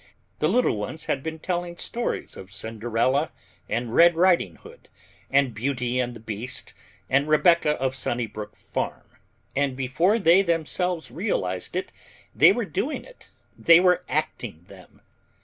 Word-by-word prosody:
The 155 - +2
little 240 - +2
ones 150 +10 -5
had 135 - -1
been 160 +2 -5
telling 175 +1 -3
stories 240 +6 -4
of 95 0 -11
Cinderella 115 +6 -1 0.4
and 115 +1 -2
Red 170 +3 +6
Riding 170 - +3
Hood - - -16 0.4
and 135 -3 +3
Beauty 125 +1 -1
and 125 -1 -2
the - - -10
Beast 110 +3 -5 0.3
and 140 +3 +2
Rebecca 155 0 +4
of 130 0 -1
Sunnybrook 110 -5 -4
Farm, - - -4 0.5
and 140 -2 0
before 165 - +2
they 185 -2 +5
themselves 170 0 -1
realized 95 - -2
that 185 +1 -3 0.4
they - - +7
were - - -1
doing - - -3
it, - - -16 0.3
they 165 0 +6
were 180 -1 +3
acting 120 - -3
them. 95 -3 -16
140 Hz, 145 wpm, -25 LUFS, 115-170 Hz, 0.5 s, they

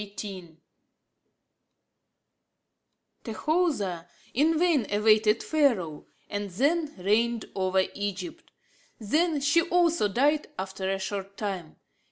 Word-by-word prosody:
XVIII 195 -5 -8 2.7
Tahoser 225 - -1 0.3
in 310 +5 +3
vain 320 - +2
awaited 215 +1 +3
Pharaoh, 230 - +1 0.2
and 205 0 -4
then 290 - +1
reigned 220 +5 +1
over 190 0 +1
Egypt. 200 -3 -5 0.5
Then 300 - +1
she 290 +4 +4
also 340 - +2
died 285 +8 +1
after 190 0 -4
a 195 - 0
short 195 0 -5
time. 190 -7 -4
210 Hz, 95 wpm, -27 LUFS, 190-295 Hz, 2.7 s, she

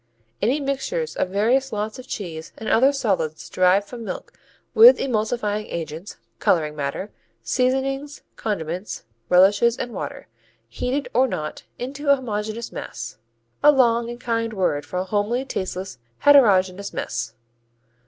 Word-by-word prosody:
_ - - -45 0.4
"Any 250 +8 +2
mixtures 285 - -2
of 180 - 0
various 240 +8 +2
lots 215 +2 -3
of 255 - -10
cheese 165 -5 -6
and 220 - -7
other 265 +5 +5
solids 195 - -1
derived 185 +2 +3
from 235 +1 -8
milk - - -6 0.4
with 470 +3 +9
emulsifying 215 -3 -1
agents, 165 +3 -6 0.2
coloring 155 -3 +2
matter, 145 +7 -4 0.3
seasonings, 270 +2 -1
condiments, 185 -2 -4 0.3
relishes 205 +6 +5
and 240 - -4
water, 150 -7 -6 0.4
heated 250 - -2
or 260 +2 +4
not, 155 -10 -5
into 280 +4 -4
a 280 - +8
homogeneous 220 -2 -4
mass." 115 -1 -7 0.4
(A 295 - +8
long 235 -4 +3
and 240 0 -7
kind 230 -2 -1
word 180 -7 0
for 180 - -4
a 180 - 0
homely, 210 +6 -1
tasteless, 185 - -4 0.2
heterogeneous 200 -9 +4
mess.) 115 0 -3
215 Hz, 140 wpm, -23 LUFS, 185-260 Hz, 0.4 s, with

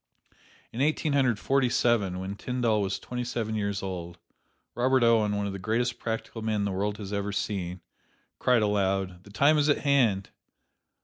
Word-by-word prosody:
In 120 - -3
Eighteen 155 +1 +1
Hundred 130 -6 +3
Forty 135 +2 +1
seven, 110 -7 +1
when 95 +2 -5
Tyndall 115 -2 0
was 100 0 -1
twenty 125 0 -5
seven 115 -3 -3
years 100 -2 -2
old, 85 -2 -5 0.6
Robert 130 +1 +2
Owen, 110 -3 +3
one 100 - -1
of 100 - -3
the 100 - -6
greatest 115 +5 -1
practical 115 0 -4
men 110 -2 0
the 100 - -1
world 100 +2 -1
has 100 -1 -7
ever 100 0 -1
seen, 95 -3 -3 0.6
cried 125 -3 +3
aloud, 95 -3 0
"The - - -13
time 140 +9 +4
is 150 +1 +2
at 145 - +2
hand!" 120 -9 +2
105 Hz, 175 wpm, -27 LUFS, 100-125 Hz, 0.6 s, time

